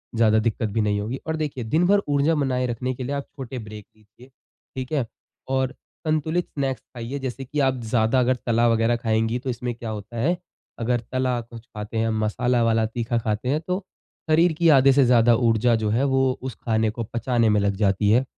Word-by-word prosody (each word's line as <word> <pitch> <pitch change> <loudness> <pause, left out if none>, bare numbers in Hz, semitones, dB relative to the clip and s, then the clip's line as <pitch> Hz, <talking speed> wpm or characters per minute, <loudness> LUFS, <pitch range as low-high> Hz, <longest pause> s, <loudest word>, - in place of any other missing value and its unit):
ज़्यादा 110 -1 +4
दिक्कत 110 0 -1
भी 110 +2 0
नहीं 105 -1 +1
होगी। 115 +6 -3
और 160 - -1
देखिए 145 -5 -3
दिन 155 +10 +1
भर 200 +1 +4
ऊर्जा 145 +3 +2
बनाए 130 -3 0
रखने 125 +2 -2
के 130 - -6
लिए 140 +3 -3
आप 140 - -4
छोटे 130 -2 -6
ब्रेक 105 -2 -9
लीजिए, 110 +4 -19 0.5
ठीक 130 +1 -5
है? 140 -5 +1 0.4
और 130 0 0 0.3
संतुलित 160 +3 0
स्नैक्स 135 -2 -3
खाइए, 125 +3 -5
जैसे 135 0 -5
कि 150 +4 -3
आप 130 -2 +2
ज़्यादा 115 +2 +3
अगर 130 +1 +3
तला 120 0 +3
वगैरह 115 +1 +2
खाएँगी 110 +1 0
तो 130 - -5
इसमें 120 0 -3
क्या 115 -1 -6
होता 110 +2 -7
है 165 +10 +1 0.4
अगर 120 +1 0
तला 130 -1 0
कुछ 115 0 -12
खाते 110 -2 -7
हैं, 115 0 +1
मसाला 115 +3 +1
वाला 115 -1 +2
तीखा 115 +1 -2
खाते 110 +1 -2
हैं 150 +3 +1
तो 185 +2 -1 0.5
शरीर 165 +2 +4
की 165 +1 +3
आधे 135 0 +6
से 140 0 +5
ज़्यादा 120 -1 +5
ऊर्जा 115 +1 +3
जो 110 -1 -1
है 115 +5 +1
वो 135 -1 +2 0.2
उस 130 -1 -5
खाने 110 -2 +1
को 115 +2 -4
पचाने 120 -1 +1
में - - +3
लग 100 0 +1
जाती 100 0 +2
है। 120 +4 +4
120 Hz, 210 wpm, -23 LUFS, 110-135 Hz, 0.5 s, आधे